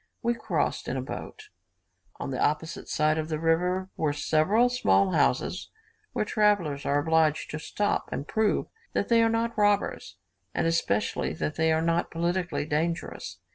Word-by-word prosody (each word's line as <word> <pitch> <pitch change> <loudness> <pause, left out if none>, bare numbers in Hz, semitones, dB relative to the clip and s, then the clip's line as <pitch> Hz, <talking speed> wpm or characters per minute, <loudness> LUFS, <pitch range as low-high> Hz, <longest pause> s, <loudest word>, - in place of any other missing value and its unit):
We 235 0 +2
crossed 235 - -2
in - - -2
a - - -1
boat. 430 -1 -8 0.7
On - - -4
the - - -1
opposite 155 +2 -1
side 155 +1 +2
of 155 0 -3
the 155 - -1
river 180 +3 +1
were 150 -2 0
several 160 +11 +3
small 245 -6 +2
houses - - +1 0.4
where - - 0
travellers 200 -10 +1
are 140 - +2
obliged 160 0 +2
to 155 - -4
stop 205 +6 -1
and 140 - -4
prove 220 -1 +1 0.3
that - - -1
they 230 -1 +5
are 225 - +4
not 230 +1 0
robbers, 205 -1 +1 0.4
and - - +1
especially 165 -11 0
that 150 - -3
they 160 +1 +2
are 160 0 +2
not 170 +1 +1
politically 175 -1 -1
dangerous. 160 +3 -2
165 Hz, 165 wpm, -27 LUFS, 155-210 Hz, 0.7 s, they